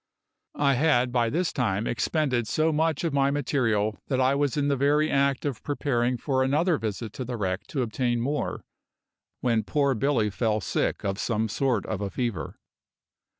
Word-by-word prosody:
I 140 -1 +3
had 130 -3 +2
by 120 -2 +2
this 170 +6 -1
time 110 -5 0
expended 125 -2 0
so 155 +8 +1
much 160 0 +1
of 165 -4 -1
my 140 -1 +3
material 115 -7 0
that 130 -2 0
I 130 +1 +3
was 140 0 0
in 145 -1 +1
the 140 - +2
very 145 +3 +2
act 140 0 +1
of 140 -6 -3
preparing 125 -4 0
for 130 +2 0
another 150 +5 +2
visit 110 0 -4
to 130 - -5
the 125 -1 -4
wreck 95 -2 -2
to 135 -5 -1
obtain 120 +1 -1
more 140 +5 -2 0.8
when 115 -3 +2
poor 140 +3 +1
Billy 115 -3 +1
fell 110 0 0
sick - - -1
of 95 0 -1
some 110 -1 0
sort 120 0 0
of 105 -2 -3
a 100 - -2
fever. 115 -4 -3
130 Hz, 180 wpm, -26 LUFS, 115-145 Hz, 0.8 s, I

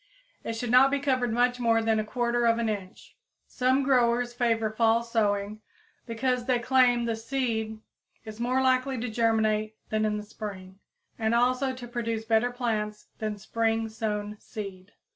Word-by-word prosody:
It 230 - -3
should 225 +1 -3
not 255 +2 +7
be 285 - +1
covered 255 -4 0
much 245 +2 +2
more 230 -1 +3
than 225 -1 +1
1/4 235 0 +1
inch. 200 -4 -6 0.3
Some 260 +2 +1
growers 245 -2 +2
favor 230 -3 +1
fall 225 +1 +2
sowing, 210 -2 -1 0.5
because 245 +1 -1
they 255 -1 +2
claim 245 -1 +3
the 230 -1 -1
seed 225 -2 -2 0.5
is 215 0 -9
more 255 +2 +1
likely 260 0 +2
to 245 +1 -3
germinate 220 -1 +1
than 215 0 0
in 210 -1 0
the 210 - -5
spring, 195 -3 -8 0.4
and 220 +1 +1
also 255 +2 +2
to 245 -1 -8
produce 230 -2 -3
better 225 +2 +2
plants 215 -4 -3
than 215 -1 -3
spring 225 +2 -1
sown 210 -1 -3
seed. 195 -2 -8
230 Hz, 155 wpm, -27 LUFS, 215-245 Hz, 0.5 s, not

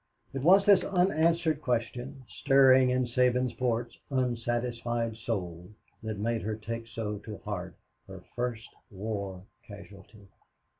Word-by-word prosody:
It 135 - -3
was 190 +7 +6
this 200 -2 +6
unanswered 170 -4 +2
question, 125 +2 -3
stirring 135 -2 +5
in 125 0 +1
Sabinsport's 125 -1 0
unsatisfied 120 -2 -1
soul, 90 -7 -4 0.3
that 110 -1 -4
made 115 +2 -1
her 110 +1 -3
take 115 +1 -6
so 110 -2 -4
to 105 -1 -8
heart 95 -3 -5 0.3
her - - -10
first 120 -2 -3 0.2
war 100 -2 -5 0.2
casualty. 100 0 -13
120 Hz, 115 wpm, -29 LUFS, 110-130 Hz, 0.3 s, was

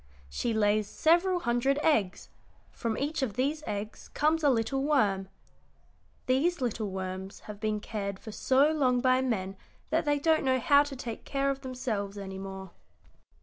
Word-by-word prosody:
She 235 - -1
lays 215 -1 +2
several 350 +3 +3
hundred 245 +2 +1
eggs; 215 -13 +1 0.4
from 230 -2 -3
each 295 +2 -2
of 240 -7 -2
these 285 +5 0
eggs 210 +1 -5
comes 310 +2 +2
a 290 - +5
little 255 +2 +1
worm. 205 -10 +2 1.0
These 315 +7 +2
little 225 -4 -2
worms 190 +1 -5
have 210 -1 -9
been 215 -1 -1
cared 200 -2 -4
for 220 - -9
so 270 +7 +3
long 260 -5 +2
by 255 0 +3
men 195 -7 -2 0.4
that 320 0 +1
they 290 0 +2
don't 315 +2 +2
know 260 -1 +3
how 285 +4 +5
to 290 -1 -4
take 235 -3 -6
care 275 0 0
of 275 0 -5
themselves 225 -6 -3
any 190 -1 -6
more. 190 -1 -7
250 Hz, 165 wpm, -29 LUFS, 205-280 Hz, 1.0 s, a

